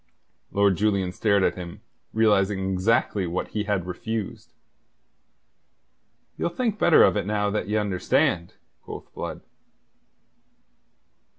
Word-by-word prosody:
Lord 100 Hz, -2 st, +3 dB
Julian 100 Hz, -3 st, +1 dB
stared 100 Hz, 0 st, +2 dB
at -, -, +2 dB
him, 85 Hz, -2 st, -9 dB, 0.3 s
realizing 100 Hz, -3 st, +2 dB
exactly 95 Hz, 0 st, +1 dB
what 85 Hz, +2 st, -3 dB
he 105 Hz, -1 st, -3 dB
had 100 Hz, -4 st, -1 dB
refused. 110 Hz, +3 st, -5 dB, 1.9 s
"You'll -, -, 0 dB
think 220 Hz, +3 st, -2 dB
better 170 Hz, -, +6 dB
of -, -, +4 dB
it 105 Hz, -, -1 dB
now 105 Hz, -1 st, 0 dB
that 105 Hz, -, -2 dB
ye 105 Hz, -, -1 dB
understand?" 100 Hz, -, 0 dB, 0.3 s
quoth -, -, -10 dB
Blood. -, -, -6 dB
100 Hz, 115 wpm, -25 LUFS, 95-110 Hz, 1.9 s, better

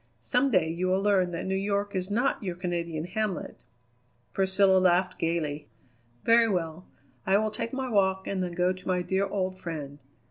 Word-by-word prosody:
Some 255 Hz, +3 st, +2 dB
day 185 Hz, -9 st, +3 dB
you 170 Hz, +3 st, -2 dB
will 190 Hz, +1 st, +1 dB
learn 195 Hz, -3 st, +3 dB
that 170 Hz, -1 st, -4 dB
New 190 Hz, -, -1 dB
York 200 Hz, +1 st, -1 dB
is 185 Hz, 0 st, -2 dB
not 240 Hz, +6 st, +1 dB
your 185 Hz, -4 st, -3 dB
Canadian 170 Hz, -3 st, -3 dB
hamlet." 195 Hz, +1 st, -3 dB, 0.8 s
Priscilla 190 Hz, 0 st, +4 dB
laughed 185 Hz, 0 st, +2 dB
gayly. 155 Hz, -3 st, -2 dB, 0.5 s
"Very 230 Hz, 0 st, +5 dB
well. 170 Hz, -2 st, -3 dB, 0.4 s
I 190 Hz, +1 st, +5 dB
will 215 Hz, +1 st, 0 dB
take 225 Hz, +2 st, -4 dB
my 265 Hz, 0 st, -3 dB
walk 190 Hz, -4 st, +1 dB
and 195 Hz, -1 st, -2 dB
then 180 Hz, -1 st, -3 dB
go 180 Hz, +1 st, +1 dB
to 185 Hz, -, -13 dB
my 180 Hz, -1 st, +1 dB
dear 190 Hz, +3 st, 0 dB
old 185 Hz, -1 st, -2 dB
friend. 150 Hz, -5 st, -6 dB
185 Hz, 180 wpm, -28 LUFS, 175-200 Hz, 0.8 s, Very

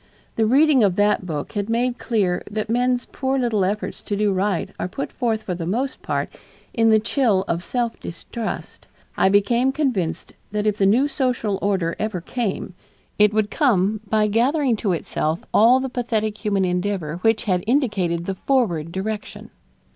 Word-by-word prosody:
The 220 Hz, -1 st, +2 dB
reading 280 Hz, +2 st, +5 dB
of 195 Hz, -3 st, +3 dB
that 205 Hz, -2 st, +2 dB
book 150 Hz, -4 st, -4 dB
had 205 Hz, 0 st, -3 dB
made 240 Hz, +2 st, 0 dB
clear 195 Hz, -7 st, 0 dB
that 215 Hz, +1 st, -3 dB
men's 245 Hz, +1 st, +1 dB
poor 265 Hz, 0 st, -1 dB
little 235 Hz, -6 st, +1 dB
efforts 205 Hz, +3 st, -2 dB
to 205 Hz, -, -3 dB
do 205 Hz, -1 st, +1 dB
right 190 Hz, -1 st, -1 dB
are -, -, -1 dB
put 275 Hz, +9 st, -5 dB
forth 225 Hz, -3 st, -1 dB
for 180 Hz, -, -3 dB
the 170 Hz, -2 st, -4 dB
most 255 Hz, +8 st, -2 dB
part -, -, -2 dB, 0.4 s
in 225 Hz, -1 st, +3 dB
the 220 Hz, -, +6 dB
chill 215 Hz, -3 st, +1 dB
of 170 Hz, +1 st, -1 dB
self 235 Hz, +3 st, -2 dB
distrust; 220 Hz, +6 st, -6 dB, 0.3 s
I -, -, +3 dB
became 235 Hz, +6 st, +3 dB
convinced 210 Hz, -, -2 dB, 0.2 s
that 210 Hz, 0 st, -1 dB
if 210 Hz, -1 st, +1 dB
the 195 Hz, -, +4 dB
new 245 Hz, +8 st, +4 dB
social 250 Hz, -8 st, -1 dB
order 190 Hz, -5 st, 0 dB
ever 215 Hz, -4 st, -2 dB
came, 200 Hz, 0 st, -3 dB, 0.5 s
it 210 Hz, 0 st, +6 dB
would 215 Hz, -1 st, 0 dB
come 215 Hz, -, +2 dB
by 215 Hz, 0 st, +3 dB
gathering 245 Hz, +5 st, +2 dB
to 205 Hz, -2 st, -1 dB
itself 160 Hz, -1 st, -2 dB
all 240 Hz, +4 st, +6 dB
the 265 Hz, -, -2 dB
pathetic 220 Hz, -4 st, -2 dB
human 200 Hz, -3 st, +1 dB
endeavor 180 Hz, -3 st, -2 dB
which 225 Hz, +4 st, +1 dB
had 185 Hz, -5 st, 0 dB
indicated 195 Hz, -, +1 dB
the 195 Hz, -, -2 dB
forward 185 Hz, -, 0 dB
direction. 210 Hz, +3 st, -5 dB
210 Hz, 175 wpm, -22 LUFS, 190-240 Hz, 0.5 s, the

